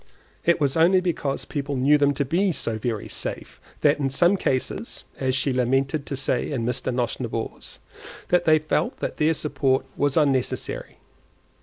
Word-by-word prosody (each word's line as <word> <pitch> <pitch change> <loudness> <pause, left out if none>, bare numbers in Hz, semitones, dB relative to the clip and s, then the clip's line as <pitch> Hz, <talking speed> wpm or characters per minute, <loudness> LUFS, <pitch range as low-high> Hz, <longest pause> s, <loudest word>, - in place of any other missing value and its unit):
It 170 0 +3
was 140 -3 +1
only 170 +3 +5
because 160 -6 -2
people 145 -1 -3
knew 145 +3 +4
them 145 0 +3
to 140 +1 0
be 180 +7 +1
so 115 -5 -3
very 110 -2 -3
safe, - - -5 0.2
that 145 0 +3
in 135 -2 0
some 175 +8 +3
cases 130 -8 -2 0.2
(as 130 -1 0
she 135 0 0
lamented 135 +4 0
to 140 - -3
say 130 0 -1
in 120 -5 -2
Mr. 125 +1 -1
Nosnibor's) 120 -2 -3 0.5
they 170 -3 +4
felt 155 0 -1
that - - -4
their 160 +1 +2
support 135 -3 0
was 145 0 +1
unnecessary. 140 -5 0
140 Hz, 160 wpm, -24 LUFS, 130-155 Hz, 0.5 s, only